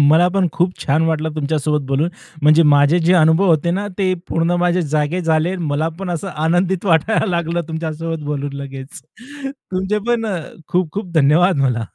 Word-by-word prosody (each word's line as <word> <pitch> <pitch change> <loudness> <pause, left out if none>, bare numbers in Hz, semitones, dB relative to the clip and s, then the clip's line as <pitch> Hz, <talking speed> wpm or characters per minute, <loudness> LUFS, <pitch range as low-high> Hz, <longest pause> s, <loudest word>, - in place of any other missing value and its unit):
मला 155 +5 +5
पण 195 -2 +2
खूप 180 +1 0
छान 150 +3 +1
वाटलं 160 -1 -1
तुमच्यासोबत 150 0 -1
बोलून, 140 +4 0 0.3
म्हणजे 155 +3 +6
माझे 145 +2 +4
जे 170 +2 +2
अनुभव 160 +2 +4
होते 165 +1 +2
ना, 200 +4 -2
ते 185 -1 +1 0.2
पूर्ण 165 +1 0
माझे 180 0 +1
जागे 150 +3 -1
झाले. 165 +1 +1
मला 155 -2 -1
पण 190 -2 -4
असं 175 +3 -3 0.2
आनंदित 175 +3 +1
वाटायला 180 +7 +2
लागलं 170 -2 -1
तुमच्यासोबत 160 0 -4
बोलून 145 -1 -3
लगेच. 135 0 -8 0.5
तुमचे 205 -6 -3
पण 235 -1 +1 0.4
खूप-खूप 180 +1 -2
धन्यवाद 160 +5 +4
मला. 120 -4 0
165 Hz, 160 wpm, -18 LUFS, 150-180 Hz, 0.5 s, म्हणजे